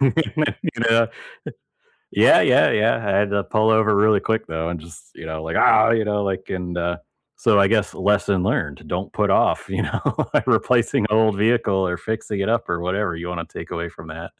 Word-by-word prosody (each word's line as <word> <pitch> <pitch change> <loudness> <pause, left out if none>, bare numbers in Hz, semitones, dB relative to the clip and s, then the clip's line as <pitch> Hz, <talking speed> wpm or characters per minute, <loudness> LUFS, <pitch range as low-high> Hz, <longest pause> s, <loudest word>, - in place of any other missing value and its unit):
you 135 -2 +3 0.8
know? 115 0 +3 1.0
Yeah, - - +5
yeah, - - +4
yeah, 110 +2 +2
I 100 -3 -1
had 100 0 +1
to 100 -1 0
pull 110 +6 +1
over 110 -1 +3
really 105 0 +3
quick 110 0 -2
though, 80 0 -3
and 85 -2 -5
just, 85 +1 -14
you - - -11
know, 80 0 -6
like, 80 0 -3
"Ah!" 110 +1 +5
you 110 -2 +1
know, 105 -1 -1
like, 95 -1 -4
and, 90 -1 -5
uh 85 0 -2 0.4
so 105 -3 +3
I 100 - +5
guess 105 -1 0
lesson 100 -2 +1
learned, 75 -7 -2
don't - - -4
put - - 0
off, - - +1
you - - -2
know, - - -3 0.5
replacing 120 -1 +2
an - - +3
old 110 -2 +3
vehicle 105 -4 +1
or 90 - -2
fixing 105 +1 -4
it 100 - -1
up 115 0 0
or 85 -1 -2
whatever 90 0 -2
you 85 +1 -7
wanna 85 -2 -5
take - - -10
away 85 0 -4
from 80 0 -14
that. 80 +1 -8
100 Hz, 210 wpm, -21 LUFS, 85-110 Hz, 1.0 s, Yeah